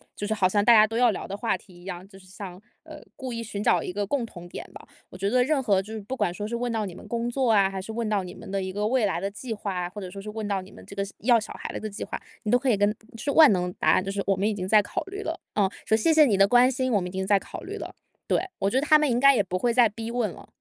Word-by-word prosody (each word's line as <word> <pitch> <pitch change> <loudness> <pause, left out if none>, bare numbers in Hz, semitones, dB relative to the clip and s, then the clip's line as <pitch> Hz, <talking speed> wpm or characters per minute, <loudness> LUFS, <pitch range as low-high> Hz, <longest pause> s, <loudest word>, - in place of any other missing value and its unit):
就 205 - -4
是 220 - 0
好 195 -4 +3
像 205 +1 +2
大 235 - +8
家 215 -1 +8
都 225 - -4
要 245 0 +5
聊 - - -5
的 195 - -5
话 230 - 0
题 185 - -20
一 - - -16
样， 185 -1 -7
就 195 -1 -15
是 190 - -17
像， 185 -1 -9 0.2
呃， 310 -1 -11
故 260 -2 -6
意 230 0 -4
寻 205 -2 -5
找 - - +3
一 - - -4
个 205 +1 -1
共 255 +2 -1
同 175 -6 -11
点 - - -7
吧。 - - -12 0.2
我 - - -11
觉 195 +2 -1
得 250 +3 +3
任 285 +1 +1
何 200 -6 +2
就 210 +3 -10
是 220 - -4
不 255 +7 -6
管 175 - 0
说 205 +3 -5
是 235 - -3
问 240 0 -2
到 220 -2 -1
你 175 - -9
们 - - -12
工 235 0 -2
作 250 -1 +1
啊， 200 -3 +4
还 195 0 -5
是 210 - -7
问 230 0 -2
到 205 -3 +1
你 180 - -8
们 - - -11
的 195 0 -1
一 185 - -4
个 210 +1 -1
未 250 -2 +2
来 185 -4 -1
的 195 - -1
计 225 +4 -6
划 205 -2 -4
啊， 180 -1 -2
或 205 +3 -8
者 185 - -6
说 195 +2 -9
是 210 - -8
问 215 -1 -4
到 200 -2 -1
你 190 - -15
们 - - -14
这 - - -10
个 200 - -1 0.2
要 235 +1 +4
小 215 - -7
孩 - - -6
子 - - -4
的 215 - -3
计 200 - -6
划， - - -5 0.2
你 210 - -1
都 245 - +6
可 260 +1 -1
以 210 - +2
跟 205 +1 +3
嗯， 210 - -3 0.2
是 255 - -4
万 310 -3 +8
能 180 -2 0
答 - - +2
案， 185 - +3
就 195 - -3
是 200 0 -2
“我 195 - +2
们 195 +2 0
已 - - -1
经 185 -2 -4
在 210 +2 +6
考 - - -4
虑 395 +1 -7
了”。 330 -4 -4 0.2
嗯， 200 -2 +3 0.2
说 220 - +3
“谢 275 +9 +2
谢 310 -1 +7
你 220 -7 +2
的 195 - +6
关 245 +4 +5
心， 255 0 -1
我 210 - +3
们 180 - -3
已 - - -10
经 190 0 -3
在 200 0 +5
考 - - -9
虑 - - -7
了”。 - - -7 0.3
对， - - +2 0.2
我 195 - +1
觉 260 - +3
得 - - -2
他 305 0 +7
们 300 -1 +1
应 240 -1 +1
该 275 +1 +7
也 210 - +3
不 185 -1 -3
会 240 +5 +2
再 240 -2 +6
逼 225 +2 -6
问 240 -3 0
了。 - - -13
210 Hz, 380 characters per minute, -26 LUFS, 195-240 Hz, 0.3 s, 大